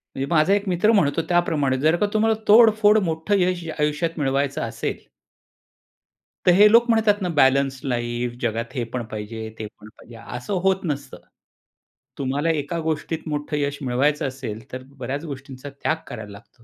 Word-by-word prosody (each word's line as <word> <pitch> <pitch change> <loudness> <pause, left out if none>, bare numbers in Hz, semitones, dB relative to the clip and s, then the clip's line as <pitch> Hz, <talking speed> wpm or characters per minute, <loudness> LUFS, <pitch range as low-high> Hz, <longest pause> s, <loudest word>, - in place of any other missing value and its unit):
म्हणजे 135 - -2
माझा 160 +4 +4
एक 205 0 0
मित्र 180 +5 +3
म्हणतो 165 -7 +2
त्याप्रमाणे, 150 -6 +1
जर 155 +4 +3
का 190 - +1
तुम्हाला 220 0 +2
तोडफोड 215 -1 +6
मोठं 165 +4 0
यश 180 -1 0 0.2
आयुष्यात 150 +3 -1
मिळवायचं 140 0 0
असेल, - - -3 1.5
तर 180 - +7
हे 205 +4 +7
लोक 235 +1 +5
म्हणतात 215 -3 +3
ना, 180 - -1
बॅलन्स 135 -1 +3
लाईफ 120 -1 -2
जगात 115 +2 -2
हे 125 - -1
पण 125 -1 -2
पाहिजे, 110 +1 -6
ते 110 - -4
पण 105 +1 -13
पाहिजे, 120 - -14 0.2
असं 125 +11 -5
होत 190 0 +2
नसतं. 145 -3 -4 1.0
तुम्हाला 140 +4 -1
एका 160 +2 -1
गोष्टीत 160 0 -2
मोठं 150 0 -3
यश 145 0 -1
मिळवायचं 140 +4 +1
असेल 125 -5 -6
तर 130 0 -6
बऱ्याचं 135 +6 -4
गोष्टींचा 135 -1 -8
त्याग 140 +3 -2
करायला 105 -1 -8
लागतो. 115 +4 -16
145 Hz, 160 wpm, -23 LUFS, 130-175 Hz, 1.5 s, तर